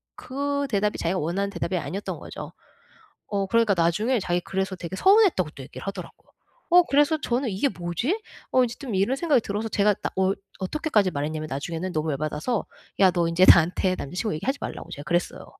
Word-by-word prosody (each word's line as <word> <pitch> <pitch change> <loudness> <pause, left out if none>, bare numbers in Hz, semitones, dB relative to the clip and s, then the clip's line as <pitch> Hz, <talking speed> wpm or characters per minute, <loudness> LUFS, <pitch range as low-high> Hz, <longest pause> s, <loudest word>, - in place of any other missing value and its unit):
그 280 +1 -2
대답이 210 -1 0
자기가 180 +3 0
원하는 190 +6 -1
대답이 190 - -2
아니었던 190 +4 -4
거죠. - - -8 0.8
어 200 -2 -1
그러니까 230 -2 +3
나중에 210 +9 +2
자기 175 -1 -1
그래서 190 +1 -2
되게 175 +1 -6
서운했다고 380 - +4
또 135 - -10
얘기를 130 - -10
하더라고요. 195 -3 -8 0.4
어 355 0 +8
그래서 295 +1 +3
저는 245 -1 0
'이게 205 +8 0
뭐지?' 185 - -2 0.3
어 255 - +5
이제 240 0 -6
좀 260 -7 -5
이런 200 +8 +2
생각이 300 -6 +3
들어서 215 +2 -3
제가 210 0 +3
나 - - -1
어 190 +1 +3 0.3
어떻게까지 210 - +1
말했냐면 155 +2 -3
나중에는 165 +6 -4
너무 155 0 -1
열받아서 155 - -2 0.3
"야 190 -2 +6
너 170 -1 +1
인제 170 +3 +4
나한테 180 +2 +5
남자 140 +1 -7
친구 210 +1 -1
얘기하지 270 - -2
말라."고 - - -6
제가 145 - -7
그랬어요. 175 +2 -1
195 Hz, 450 characters per minute, -25 LUFS, 170-245 Hz, 0.8 s, 어